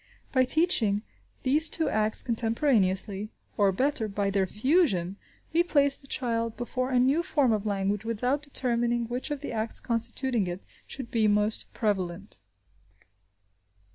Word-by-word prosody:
By 260 Hz, -1 st, +3 dB
teaching 250 Hz, -, +2 dB, 0.4 s
these 300 Hz, +5 st, +4 dB
two 320 Hz, 0 st, 0 dB
acts 215 Hz, 0 st, +1 dB
contemporaneously, 220 Hz, -4 st, +1 dB, 0.3 s
or, 200 Hz, -2 st, +3 dB
better, 255 Hz, +2 st, 0 dB
by 200 Hz, -1 st, -1 dB
their 195 Hz, -1 st, +1 dB
fusion, 210 Hz, -, +1 dB, 0.4 s
we 335 Hz, -, +4 dB
place 285 Hz, -5 st, +2 dB
the 275 Hz, -, -18 dB
child 230 Hz, -3 st, -1 dB
before 255 Hz, +1 st, -3 dB
a 255 Hz, -, +1 dB
new 265 Hz, +6 st, +3 dB
form 290 Hz, -9 st, +1 dB
of 215 Hz, 0 st, -2 dB
language 200 Hz, 0 st, -1 dB
without 245 Hz, +5 st, -1 dB
determining 240 Hz, -4 st, 0 dB
which 245 Hz, +5 st, -2 dB
of 295 Hz, -2 st, -4 dB
the 290 Hz, -, -5 dB
acts 220 Hz, 0 st, -2 dB
constituting 235 Hz, -2 st, 0 dB
it 175 Hz, +2 st, -6 dB, 0.2 s
should 260 Hz, -4 st, -8 dB
be 220 Hz, -2 st, +2 dB
most 210 Hz, +1 st, +1 dB
prevalent. 185 Hz, -, -2 dB
230 Hz, 140 wpm, -27 LUFS, 205-265 Hz, 0.4 s, these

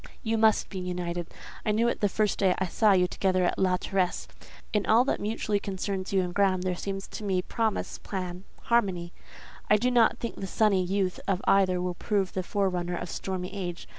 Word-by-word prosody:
You 225 Hz, -1 st, 0 dB
must 220 Hz, -1 st, +3 dB
be 190 Hz, -, -5 dB
united. 175 Hz, -1 st, -3 dB, 0.4 s
I 215 Hz, -, +1 dB
knew 225 Hz, +3 st, +2 dB
it 235 Hz, -, -1 dB
the 205 Hz, -, +2 dB
first 210 Hz, 0 st, 0 dB
day 190 Hz, -2 st, +3 dB
I 190 Hz, -, 0 dB
saw 210 Hz, +3 st, +3 dB
you 180 Hz, -1 st, +4 dB
together 185 Hz, 0 st, +1 dB
at -, -, 0 dB
La 185 Hz, -1 st, +3 dB
Terrasse. 185 Hz, -1 st, -1 dB, 0.5 s
In 210 Hz, -2 st, +1 dB
all 230 Hz, +3 st, +5 dB
that -, -, 0 dB
mutually 210 Hz, -1 st, -1 dB
concerns 195 Hz, -1 st, -3 dB
you 195 Hz, -1 st, +3 dB
and 175 Hz, -1 st, -4 dB
Graham 190 Hz, -2 st, +2 dB
there 185 Hz, -1 st, 0 dB
seems 195 Hz, +1 st, -5 dB
to -, -, -7 dB
me 190 Hz, -3 st, 0 dB
promise, 225 Hz, 0 st, -2 dB
plan, 180 Hz, -2 st, -5 dB, 0.2 s
harmony. 190 Hz, -7 st, +1 dB, 0.6 s
I 210 Hz, -, +6 dB
do 250 Hz, +4 st, +1 dB
not 235 Hz, -2 st, +4 dB
think 235 Hz, -, -5 dB
the 195 Hz, -, -4 dB
sunny 200 Hz, -1 st, +2 dB
youth 185 Hz, 0 st, -1 dB
of 195 Hz, -2 st, +1 dB
either 185 Hz, -2 st, +3 dB
will 180 Hz, 0 st, -2 dB
prove 195 Hz, +1 st, -1 dB
the 190 Hz, -, -1 dB
forerunner 180 Hz, -2 st, -1 dB
of 175 Hz, -, -5 dB
stormy 185 Hz, -1 st, -4 dB
age. 175 Hz, -3 st, -5 dB
190 Hz, 205 wpm, -28 LUFS, 180-210 Hz, 0.6 s, I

